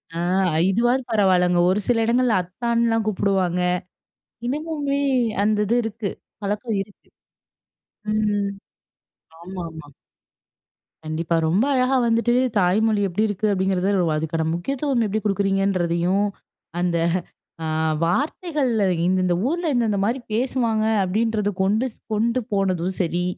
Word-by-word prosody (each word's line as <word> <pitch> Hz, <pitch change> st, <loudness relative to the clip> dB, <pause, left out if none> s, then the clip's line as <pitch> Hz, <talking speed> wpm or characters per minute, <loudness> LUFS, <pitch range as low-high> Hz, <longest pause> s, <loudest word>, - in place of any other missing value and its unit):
அ -, -, -4 dB, 0.5 s
இதுவாது 240 Hz, +6 st, +2 dB
பரவால்லங்க. 180 Hz, -4 st, +3 dB
ஒரு 190 Hz, +3 st, +2 dB
சில 230 Hz, -2 st, +2 dB
இடங்கள்ல 235 Hz, -3 st, +2 dB
அத்தான்ல்லாம் 230 Hz, +4 st, 0 dB
கூப்புடுவாங்க. 190 Hz, -3 st, +1 dB, 0.9 s
இன்னமுமே 290 Hz, 0 st, -2 dB, 0.4 s
அந்த 215 Hz, 0 st, +2 dB
இது 235 Hz, +4 st, +2 dB
இருக்கு. 220 Hz, -2 st, -3 dB, 0.3 s
பழக்கம் 210 Hz, +1 st, -2 dB
இருக்கு. 205 Hz, 0 st, -18 dB, 1.0 s
ம். 210 Hz, -2 st, +1 dB, 0.9 s
ஆமாமா. 170 Hz, -4 st, -8 dB, 1.2 s
கண்டிப்பா. 160 Hz, +2 st, -1 dB
ரொம்ப 190 Hz, +11 st, +2 dB
அழகா 255 Hz, +1 st, +2 dB
வந்துட்டு 230 Hz, +1 st, +2 dB, 0.2 s
"தாய்மொழி 205 Hz, +3 st, +2 dB
எப்படி 190 Hz, +4 st, -1 dB
இருக்கு?" 205 Hz, +1 st, -1 dB
அப்படீங்கிறது 190 Hz, 0 st, 0 dB, 0.2 s
ஒ -, -, +1 dB
அதுக்கான 160 Hz, +1 st, -2 dB
முக்கியத்துவம் 260 Hz, -, -1 dB
எப்படி 215 Hz, +1 st, -1 dB
குடுக்குறீங்கன்றதையும், 195 Hz, -2 st, +1 dB, 0.5 s
"அந்த 175 Hz, -1 st, +1 dB, 0.7 s
அ -, -, -2 dB, 0.4 s
வார்த்தைகள் 290 Hz, -, 0 dB, 0.4 s
இந்தந்த 185 Hz, -1 st, +2 dB
ஊர்ல 335 Hz, -1 st, -1 dB
இந்தந்த 225 Hz, -5 st, +1 dB
மாரி 245 Hz, +5 st, 0 dB
பேசுவாங்க." 230 Hz, -3 st, 0 dB, 0.2 s
அப்படீன்றத 210 Hz, +2 st, 0 dB
கொண்டு 215 Hz, +6 st, +1 dB
ஸ் -, -, -30 dB
கொண்டு 230 Hz, +4 st, +1 dB
போனதும் 190 Hz, -2 st, 0 dB
சரி, 175 Hz, 0 st, 0 dB
205 Hz, 110 wpm, -22 LUFS, 185-235 Hz, 1.2 s, பரவால்லங்க